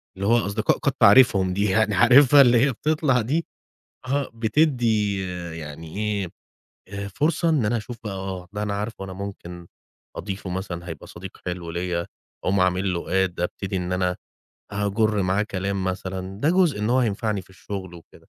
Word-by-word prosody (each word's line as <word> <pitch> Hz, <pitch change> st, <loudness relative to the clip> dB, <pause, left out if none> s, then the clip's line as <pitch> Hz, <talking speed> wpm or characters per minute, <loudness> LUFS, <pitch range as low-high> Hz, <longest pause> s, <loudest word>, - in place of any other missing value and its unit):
اللي 100 Hz, +1 st, -3 dB
هو 120 Hz, +1 st, +5 dB
أصدقاء 105 Hz, +2 st, +1 dB
قد 140 Hz, -, 0 dB
تعرفهم 100 Hz, -5 st, +5 dB
دي، 100 Hz, +2 st, 0 dB
يعني 105 Hz, 0 st, +2 dB
عارفها 130 Hz, +6 st, +7 dB
اللي 120 Hz, -2 st, +6 dB
هي 140 Hz, -, +1 dB
بتطلع 150 Hz, -1 st, +1 dB
دي؟ 150 Hz, +9 st, -1 dB, 0.6 s
آه 140 Hz, +1 st, -1 dB
بتدّي 115 Hz, -4 st, +1 dB, 0.4 s
يعني 80 Hz, +3 st, -8 dB
إيه 105 Hz, -3 st, -1 dB, 0.6 s
آآ 100 Hz, 0 st, -5 dB
فرصة 160 Hz, -, 0 dB
إن 150 Hz, -7 st, +2 dB
أنا 120 Hz, -, +1 dB
أشوف 115 Hz, +2 st, -6 dB
بقى، 105 Hz, -, -4 dB
آه 95 Hz, -2 st, -6 dB
ده 105 Hz, 0 st, -3 dB
أنا 105 Hz, -1 st, -2 dB
عارفه، 105 Hz, 0 st, -4 dB
أنا 95 Hz, -, -7 dB
ممكن 90 Hz, -3 st, -8 dB, 0.5 s
أضيفه 95 Hz, -1 st, -5 dB
مثلًا، 90 Hz, -2 st, -5 dB
هيبقى 80 Hz, -, -8 dB
صديق 95 Hz, +2 st, -10 dB
حلو 90 Hz, -2 st, -4 dB
ليّا، 85 Hz, 0 st, -2 dB, 0.4 s
أقوم 95 Hz, 0 st, +2 dB
عامل 90 Hz, +1 st, +1 dB
له 85 Hz, -, -3 dB
Add، 95 Hz, 0 st, +1 dB
أبتدي 95 Hz, +2 st, -3 dB
إن 90 Hz, 0 st, -2 dB
أنا 90 Hz, -1 st, 0 dB, 0.6 s
هاجُر 105 Hz, +1 st, +1 dB
معاه 95 Hz, +3 st, +1 dB
كلام 100 Hz, -1 st, -3 dB
مثلًا، 95 Hz, +1 st, -4 dB
ده 150 Hz, -, +3 dB
جزء 180 Hz, -, +3 dB
إن 105 Hz, +2 st, -1 dB
هو 130 Hz, -, +3 dB
هينفعني 105 Hz, -3 st, 0 dB
في 90 Hz, -, -22 dB
الشغل 95 Hz, -1 st, -7 dB
وكده. 85 Hz, -, -16 dB
100 Hz, 175 wpm, -24 LUFS, 95-115 Hz, 0.6 s, عارفها